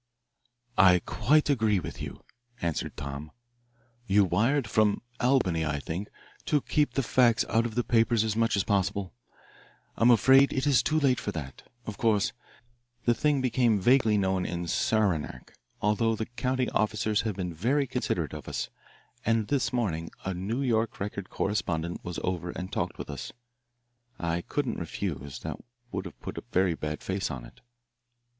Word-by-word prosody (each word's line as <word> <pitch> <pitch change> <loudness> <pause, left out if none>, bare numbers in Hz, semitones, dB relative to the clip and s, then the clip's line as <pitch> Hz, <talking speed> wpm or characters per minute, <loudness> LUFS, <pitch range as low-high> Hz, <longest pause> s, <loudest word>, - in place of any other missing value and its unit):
"I 90 -1 +8
quite 145 +8 +3
agree 110 -7 +2
with - - -7
you," - - -7 0.4
answered 85 -2 -2
Tom. 70 +2 -6 0.8
"You 100 +1 +5
wired, 115 +9 +2
from 110 0 +2 0.2
Albany, 120 -11 +2
I 75 -2 -1
think, 85 +9 -4 0.4
to 150 - +2
keep 150 +2 0
the 135 - +1
facts 120 -1 +3
out 115 +1 +2
of 110 - -9
the 120 - +1
papers 115 -1 +3
as 110 -1 -1
much 115 -1 +2
as 100 - +2
possible. 100 -2 0 0.8
I'm 115 - +4
afraid 130 +4 +6
it 135 +1 0
is 135 -5 +5
too 155 0 +1
late 130 -5 +3
for 105 - -3
that. 70 -5 -6 0.2
Of 105 -1 -6
course 110 -4 +2 0.7
the 120 - +5
thing 145 +2 +1
became 120 -4 +2
vaguely 115 0 +4
known 95 -2 +1
in 85 -1 -3
Saranac, 85 - 0 0.3
although 110 +2 +2
the 110 - -3
county 125 +2 -1
officers 105 0 +1
have 110 -4 -2
been 90 -3 -3
very 130 - +1
considerate - - -2
of - - -8
us, - - -3 0.5
and 115 -2 +1
this 140 -3 +1
morning 85 -10 -1 0.2
a 95 - -1
New 105 +9 -2
York 115 -3 0
Record 100 -1 -4
correspondent 85 -4 -2
was 90 -1 -5
over 90 -1 -2
and 90 +2 -6
talked - - -2
with - - -6
us. - - -6 0.9
I 85 0 -1
couldn't - - -2
refuse, 70 -8 -4
that - - -5 0.3
would 95 - -3
have 90 - -10
put - - -5
a - - -14
very 90 -1 +3
bad 75 -1 -5
face 95 +1 -2
on 65 -3 -6
it." - - -17
105 Hz, 165 wpm, -28 LUFS, 90-120 Hz, 0.9 s, I